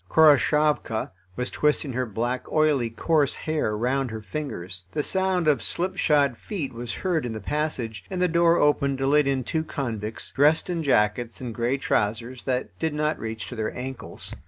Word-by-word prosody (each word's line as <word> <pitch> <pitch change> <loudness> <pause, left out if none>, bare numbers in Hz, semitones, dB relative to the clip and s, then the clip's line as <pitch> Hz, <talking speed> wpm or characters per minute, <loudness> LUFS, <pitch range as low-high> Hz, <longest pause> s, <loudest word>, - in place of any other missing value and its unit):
Khoroshavka 150 -5 +3 0.2
was 125 +3 -3
twisting 150 -2 +1
her 125 +1 -1
black, 120 +4 -3
oily, 150 -6 +3
coarse 145 +5 +1
hair 155 -9 -1
round 130 +3 0
her 110 -1 -6
fingers. 95 -8 -5
The 150 - 0
sound 190 -2 +1
of 150 -2 +3
slipshod 150 -7 +1
feet 155 - -4
was 120 0 -5
heard 175 -5 0
in 120 -2 -3
the 110 - -5
passage, 125 -4 -3
and 185 - -3
the 180 - +3
door 170 0 +4
opened 140 -2 +2
to 135 - -1
let 145 +1 +4
in 135 -2 +1
two 160 +7 -1
convicts, 115 -8 -4
dressed 150 +5 +3
in 170 -2 -1
jackets 115 -4 +1
and 125 -3 -5
grey 120 +4 0
trousers 115 0 -1
that 130 -1 -1
did 160 -2 -1
not 150 +1 0
reach 110 -1 -5
to 125 - -7
their 110 -1 -3
ankles. 130 +1 -6
135 Hz, 180 wpm, -25 LUFS, 115-155 Hz, 0.2 s, door